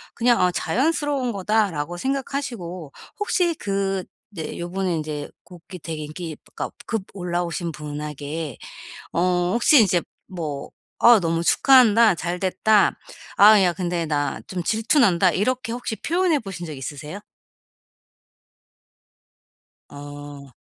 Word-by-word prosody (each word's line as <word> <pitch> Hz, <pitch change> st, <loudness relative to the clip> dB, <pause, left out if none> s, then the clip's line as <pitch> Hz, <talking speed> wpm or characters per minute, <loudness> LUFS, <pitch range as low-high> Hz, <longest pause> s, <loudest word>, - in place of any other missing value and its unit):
그냥 240 Hz, 0 st, +3 dB
'어 180 Hz, -, +3 dB
자연스러운 270 Hz, -, 0 dB
거다.'라고 190 Hz, -5 st, 0 dB
생각하시고 240 Hz, -, -4 dB, 0.3 s
혹시 360 Hz, -4 st, +1 dB
그 195 Hz, -3 st, -2 dB, 0.3 s
이제 165 Hz, -5 st, -6 dB
요번에 180 Hz, +1 st, -2 dB
인제 150 Hz, -2 st, -4 dB
곡이 180 Hz, +1 st, -12 dB
되게 155 Hz, -1 st, -5 dB
인기 155 Hz, +1 st, -7 dB, 0.2 s
그러니까 -, -, -4 dB
급 225 Hz, -4 st, -2 dB
올라오신 175 Hz, -2 st, -3 dB
분에게 150 Hz, -1 st, -6 dB, 0.6 s
어 180 Hz, +1 st, +1 dB
혹시 240 Hz, +4 st, +5 dB
인제 180 Hz, -5 st, +3 dB, 0.3 s
뭐 155 Hz, -7 st, -5 dB, 0.3 s
"아 235 Hz, -2 st, +7 dB
너무 165 Hz, -1 st, 0 dB
축하한다. 230 Hz, 0 st, +5 dB
잘됐다. 185 Hz, +4 st, +1 dB, 0.4 s
아 210 Hz, 0 st, +8 dB
야 180 Hz, -, +3 dB
근데 170 Hz, -1 st, -2 dB
나 145 Hz, -2 st, -1 dB
좀 180 Hz, -2 st, -4 dB
질투 220 Hz, -, +1 dB
난다." 185 Hz, -5 st, +4 dB
이렇게 245 Hz, +7 st, -1 dB
혹시 240 Hz, -2 st, -4 dB
표현해 345 Hz, +1 st, +1 dB
보신 195 Hz, -7 st, -7 dB
적 155 Hz, -, -6 dB
있으세요? 150 Hz, +7 st, -7 dB, 2.7 s
아. 145 Hz, -1 st, -10 dB
180 Hz, 255 characters per minute, -23 LUFS, 160-220 Hz, 2.7 s, 아